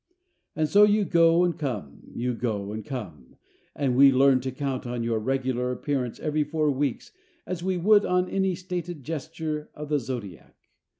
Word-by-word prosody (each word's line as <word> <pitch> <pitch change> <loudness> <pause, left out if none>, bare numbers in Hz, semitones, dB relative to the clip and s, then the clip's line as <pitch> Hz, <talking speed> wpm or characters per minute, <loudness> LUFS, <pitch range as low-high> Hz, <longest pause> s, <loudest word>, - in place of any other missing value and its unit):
And 155 0 +1
so 200 +7 +5
you 210 0 +4
go 170 0 +4
and 175 -1 +1
come, 120 - -4
you 125 +1 -1
go 105 -4 -3
and 110 +1 -5
come, 90 - -8 0.4
and 135 -4 0
we 135 +1 +7
learn 135 0 +5
to 130 +1 -3
count 130 -1 -3
on 120 -1 -3
your 115 -1 0
regular 125 +1 -1
appearance 125 -2 -3
every 150 0 0
four 150 0 0
weeks 140 -1 -2 0.3
as 180 -1 -4
we 185 0 0
would 205 +4 +5
on 180 0 +1
any 190 -1 0
stated 175 -4 -5
gesture 155 +1 -4
of 150 0 -7
the 150 -1 +2
zodiac. 115 - -7
140 Hz, 175 wpm, -26 LUFS, 125-165 Hz, 0.4 s, we